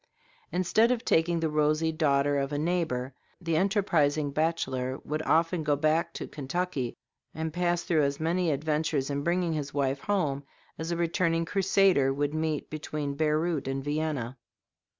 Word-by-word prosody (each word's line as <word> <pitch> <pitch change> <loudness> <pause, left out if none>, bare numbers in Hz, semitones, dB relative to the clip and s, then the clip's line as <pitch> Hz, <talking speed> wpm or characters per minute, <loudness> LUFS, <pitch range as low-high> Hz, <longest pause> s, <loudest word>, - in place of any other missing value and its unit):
Instead 185 +6 +3
of 250 -2 0
taking 165 +1 +2
the 160 - +1
rosy 155 +1 +1
daughter 145 -2 +2
of 135 +1 -2
a 145 - -1
neighbor, 150 -6 -1 0.3
the 165 -3 -1
enterprising 160 -6 +2
bachelor 135 -5 -1
would 155 +1 -2
often 165 +1 +2
go 150 -1 +2
back 160 +3 +1
to - - -6
Kentucky, 145 -3 -3 0.4
and 160 0 -3
pass 175 0 0
through 160 -3 +2
as 140 -1 0
many 170 +2 +1
adventures 150 -1 0
in 140 0 -1
bringing 170 +1 0
his 145 -2 -4
wife 135 -1 0
home 150 -7 -1 0.4
as 160 +1 -3
a 170 - -1
returning 165 0 +1
crusader 190 -6 +3
would 145 +2 -1
meet 155 -1 -1
between 150 -2 -4
Beirut 155 0 0
and 135 0 -2
Vienna. 145 -4 -2
155 Hz, 155 wpm, -28 LUFS, 145-170 Hz, 0.4 s, Instead